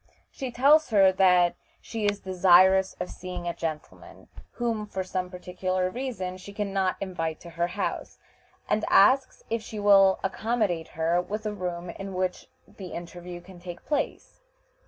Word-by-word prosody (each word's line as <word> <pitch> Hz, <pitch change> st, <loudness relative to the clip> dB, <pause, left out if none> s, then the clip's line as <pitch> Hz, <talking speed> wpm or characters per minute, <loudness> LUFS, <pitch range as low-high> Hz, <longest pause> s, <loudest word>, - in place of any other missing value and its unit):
She 265 Hz, -3 st, -5 dB
tells 285 Hz, +6 st, +4 dB
her 195 Hz, -4 st, +5 dB
that 180 Hz, -2 st, +4 dB, 0.3 s
she 220 Hz, -3 st, -3 dB
is 205 Hz, 0 st, 0 dB
desirous 190 Hz, +1 st, +5 dB
of 180 Hz, -, -4 dB
seeing 180 Hz, -1 st, -7 dB
a 170 Hz, -, -1 dB
gentleman, 160 Hz, -3 st, -7 dB, 0.2 s
whom, 230 Hz, -3 st, -2 dB
for 190 Hz, -2 st, -3 dB
some 185 Hz, 0 st, -3 dB
particular 185 Hz, 0 st, -2 dB
reason, 220 Hz, -8 st, -4 dB
she 200 Hz, +2 st, -11 dB
can 205 Hz, -1 st, -3 dB
not 190 Hz, -1 st, +1 dB
invite 165 Hz, -5 st, -3 dB
to 170 Hz, -, -11 dB
her 170 Hz, +1 st, -1 dB
house, 175 Hz, -, -4 dB, 0.5 s
and 215 Hz, -, +1 dB
asks 260 Hz, +7 st, +4 dB
if 230 Hz, 0 st, 0 dB
she 215 Hz, 0 st, -8 dB
will 195 Hz, -2 st, +5 dB
accommodate 195 Hz, -4 st, -1 dB
her 165 Hz, +2 st, +2 dB
with 210 Hz, +4 st, -5 dB
a 210 Hz, -, -2 dB
room 180 Hz, -2 st, -4 dB
in 195 Hz, -1 st, -7 dB
which 185 Hz, 0 st, -2 dB, 0.2 s
the 190 Hz, -, -10 dB
interview 175 Hz, +1 st, -8 dB
can 185 Hz, 0 st, -14 dB
take 175 Hz, -1 st, -9 dB
place. 295 Hz, -, -3 dB
185 Hz, 160 wpm, -27 LUFS, 180-210 Hz, 0.5 s, her